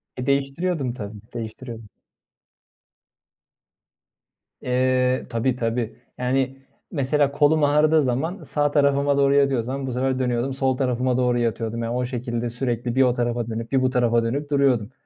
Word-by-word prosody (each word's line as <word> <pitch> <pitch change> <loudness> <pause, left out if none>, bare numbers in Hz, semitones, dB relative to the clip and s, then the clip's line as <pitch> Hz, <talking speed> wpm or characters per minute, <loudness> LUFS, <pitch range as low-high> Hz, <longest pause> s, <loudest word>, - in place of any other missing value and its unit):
E, 125 - -4
değiştiriyordum, 140 0 0
tabii, 105 -3 -7
değiştiriyordum. 115 -1 -7 2.7
Eee, 125 0 +1
tabii, 120 +2 0
tabii. 115 -1 -2 0.2
Yani, 130 +1 0 0.3
mesela 140 -1 +1
kolum 150 +2 +3
ağrıdığı 150 +1 +4
zaman 150 +10 -2
sağ 145 -1 0
tarafıma 140 -1 +2
doğru 140 0 +4
yatıyorsam, 135 -1 +1
bu - - -3
sefer 130 +1 0
dönüyordum, 125 +1 0
sol 130 -1 0
tarafıma 125 -1 0
doğru 125 -1 +2
yatıyordum. 115 0 -2
Yani, 115 +1 -2
o 125 - 0
şekilde 120 -1 -3
sürekli 120 0 -2
bir 135 - +4
o 125 -1 +3
tarafa 120 -1 -1
dönüp 115 +1 -5
bir 135 -1 +3
bu 130 - +2
tarafa 120 -2 +2
dönüp 140 +5 -2
duruyordum. 130 -6 +2
130 Hz, 145 wpm, -23 LUFS, 120-140 Hz, 2.7 s, ağrıdığı